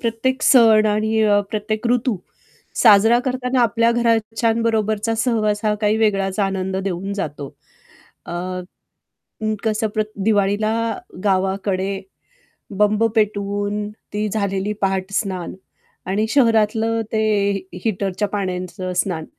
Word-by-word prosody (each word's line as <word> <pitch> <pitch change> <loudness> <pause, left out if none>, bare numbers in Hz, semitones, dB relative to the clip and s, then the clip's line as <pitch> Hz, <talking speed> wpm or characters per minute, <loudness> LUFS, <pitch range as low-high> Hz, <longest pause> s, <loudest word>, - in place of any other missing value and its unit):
प्रत्येक 260 +4 -1
सण 225 -4 +6
आणि 220 +1 +1 0.3
प्रत्येक 215 +1 -2
ऋतू 245 -2 +1 0.7
साजरा 225 +1 +6
करताना 255 -1 0
आपल्या 230 0 +3
घरच्यांबरोबरचा 225 -1 +1
सहवास 220 -3 0
हा 210 - +2
काही 210 0 +2
वेगळाच 195 -3 0
आनंद 190 -1 -1
देऊन 195 0 -3
जातो. 150 -7 -4 0.8
अ, - - -6 1.3
कसं 220 0 0
प्र 215 - +2 0.2
दिवाळीला 205 0 +2 0.5
गावाकडे 195 0 0 0.8
बंब 210 +1 +3
पेटवून 205 0 -1 0.2
ती 210 +1 -1
झालेली 200 -1 -1
पहाटस्नान 190 -1 -2 0.5
आणि 200 +4 0
शहरातलं 225 -3 +2
ते 220 - +1 0.3
ही 190 -2 -7
हीटरच्या 200 -1 -1
पाण्याचं 185 -2 -4
स्नान 175 -3 -1
210 Hz, 100 wpm, -20 LUFS, 195-225 Hz, 1.3 s, सण